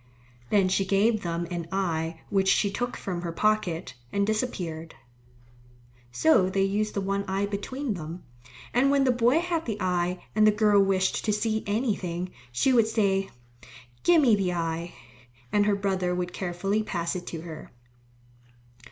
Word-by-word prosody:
Then 200 -3 +3
she 195 +1 +1
gave 205 +3 +2
them 170 0 -2
an 170 -2 -4
eye 165 -4 -2
which 195 -1 +2
she 200 +1 +3
took 245 +4 -3
from 180 -3 -4
her 170 -1 -3
pocket, 185 -3 0 0.2
and 200 0 +1
disappeared. 180 -8 -3 1.2
So 160 +9 +4
they 195 0 +1
used 210 +2 -1
the 200 - 0
one 195 +1 -1
eye 195 +1 0
between 220 +6 -3
them, 165 0 -7 0.5
and 260 +3 +4
when 280 -1 +3
the 260 - +4
boy 245 +3 +3
had 340 -2 -2
the 215 -2 -2
eye 180 -1 -1
and 215 0 +4
the - - +7
girl 210 -1 +4
wished 190 -1 +1
to 215 - +2
see 220 +1 0
anything, 190 -5 -1 0.2
she 255 - +2
would 230 -3 +4
say, 195 -3 +1 0.7
"Give 345 -1 +5
me 235 -5 +5
the 190 -3 0
eye," 170 0 -3 0.6
and 205 0 +3
her 205 - +3
brother 190 -3 -1
would 180 0 -3
carefully 195 +3 -1
pass 170 -5 -2
it 180 -1 -6
to 165 - -5
her. 160 -2 -9
195 Hz, 165 wpm, -27 LUFS, 175-215 Hz, 1.2 s, the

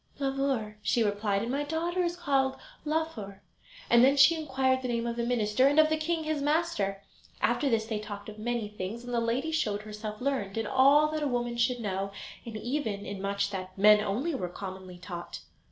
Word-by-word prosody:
"Blauvor," 270 -6 -1
she 225 +3 +2
replied 205 -1 0
"and 235 - -3
my 280 +2 0
daughter 335 +4 -1
is 345 -1 0
called 275 -5 +1 0.3
Laufer"; 295 -11 -3 0.4
and 235 0 +6
then 275 +2 +5
she 280 +4 +8
inquired 265 -4 0
the 255 - -3
name 235 -1 -1
of 235 0 -2
the 235 - -1
minister, 235 +1 +2
and 290 +2 +2
of 310 0 +6
the 315 - +2
king 320 +1 -1
his 310 -2 -1
master. 285 -11 0 0.4
After 285 - +1
this 225 -2 +1
they 220 -1 -3
talked 205 -1 -7
of 215 0 -9
many 235 -1 -2
things, 210 +3 -6
and 245 0 -6
the 235 - +2
lady 235 +7 -1
showed 210 -10 -1
herself 215 0 -7
learned 250 -7 -2
in 225 - -1
all 275 +5 +5
that 310 0 -2
a 295 - +1
woman 240 -2 -1
should 240 +1 +1
know, 195 -1 -2 0.4
and 225 -2 -5
even 220 -4 -3
in 195 0 -6
much 200 0 -1
that 185 -1 -6
men 210 +1 +7
only 235 +11 -1
were 185 -10 -3
commonly 185 -1 -8
taught. 175 -1 -7
235 Hz, 205 wpm, -29 LUFS, 205-280 Hz, 0.4 s, she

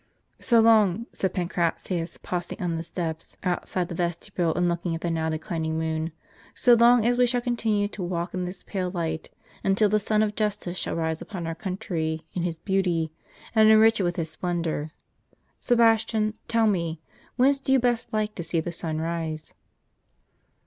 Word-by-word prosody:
' - - -45
" - - -48
" - - -44
So 235 -2 +6
long," 220 -2 +4
said 190 - -1
Pancratius, 175 -1 -2
pausing 175 -1 -4
on 175 -2 -1
the 165 - -2
steps 165 -1 -5
outside 180 0 -1
the - - -6
vestibule, 170 0 -1
and 175 0 +2
looking 170 -1 -1
at 165 - -6
the 170 - -1
now 160 -1 0
declining 160 0 -2
moon, 160 0 -2 0.2
" - - -26
so 245 - +5
long 235 0 +6
as 245 +1 +3
we 250 - +5
shall 245 0 +1
continue 225 -4 0
to 210 - -8
walk 175 0 -3
in 185 -1 -2
this 180 +1 -7
pale 185 -3 -3
light, 165 -3 -3 0.3
and 195 - +3
until 210 +1 +3
the 215 +1 +3
Sun 215 +1 +2
of 210 -1 -1
Justice 210 -4 -2
shall - - -2
rise 160 -1 -1
upon 185 -5 -6
our 165 - -2
country 165 -4 -3
in 180 - -2
His 170 -2 -2
beauty, 175 -4 0 0.4
and 220 -1 +6
enrich 220 +1 +6
it - - +1
with 175 -1 0
His 160 -2 -3
splendor. 170 -4 -2 0.7
Sebastian, 225 -2 +3
tell 230 -1 +2
me, 170 -6 0 0.4
whence 275 +3 +4
do 270 - -2
you 270 - +6
best 240 -2 0
like 215 -1 -1
to 175 - -5
see 165 0 -1
the 170 +2 -3
sun 160 -2 -3
rise? 160 -1 -4
180 Hz, 195 wpm, -26 LUFS, 165-215 Hz, 0.7 s, So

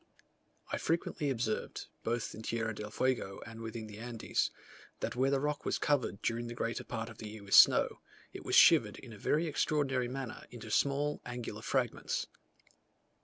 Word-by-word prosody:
I - - -1
frequently 165 -2 0
observed, 115 -4 -2 0.2
both 115 0 -1
in 110 - -8
Tierra 115 0 -1
del 105 0 -6
Fuego 120 -4 -1
and 115 0 -9
within 115 0 -5
the 105 -1 -10
Andes, 120 -1 -1 0.5
that - - -3
where 130 +2 +3
the 140 0 +2
rock 150 +1 -1
was - - 0
covered 140 -8 0
during 120 +1 -1
the 120 - -6
greater 115 0 -2
part 115 -1 -4
of 115 -2 -11
the 110 - -6
year 105 -1 -9
with 100 - -5
snow, - - +7 0.3
it - - -8
was - - 0
shivered - - +7
in 115 - -10
a 105 - -11
very 155 +10 +2
extraordinary 140 -5 +1
manner 130 -2 -5
into 115 -3 -9
small 145 +3 +1
angular 120 -3 -6
fragments. 125 -1 -1
120 Hz, 175 wpm, -33 LUFS, 110-135 Hz, 0.5 s, snow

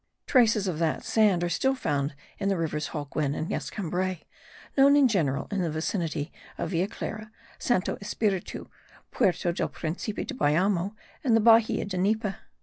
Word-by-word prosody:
traces 225 -6 +4
of 165 -4 -2
that 165 -2 0
sand 205 -6 +3
are - - +1
still 265 +9 +1
found 145 - -1 0.2
in 195 - 0
the 195 - +1
rivers 155 -2 -2
Holguin 145 -1 -2
and 160 - -3
Escambray, 185 -2 -3 0.5
known 280 +1 +6
in 285 -2 +6
general 150 - 0
in 200 -2 0
the 170 - 0
vicinity 160 -1 -2 0.3
of - - -3
Villa 180 +2 +1
Clara, 215 0 -6 0.3
Santo 220 -7 0
Espiritu, 200 -2 -2 0.4
Puerto 180 -1 +1
del - - -1
Principe 180 +6 -4
de 290 - -5
Bayamo 190 - +1 0.3
and 240 -5 +3
the - - +3
Bahia 225 0 +5
de 190 -3 -4
Nipe. 210 +2 +1
185 Hz, 160 wpm, -27 LUFS, 165-215 Hz, 0.5 s, known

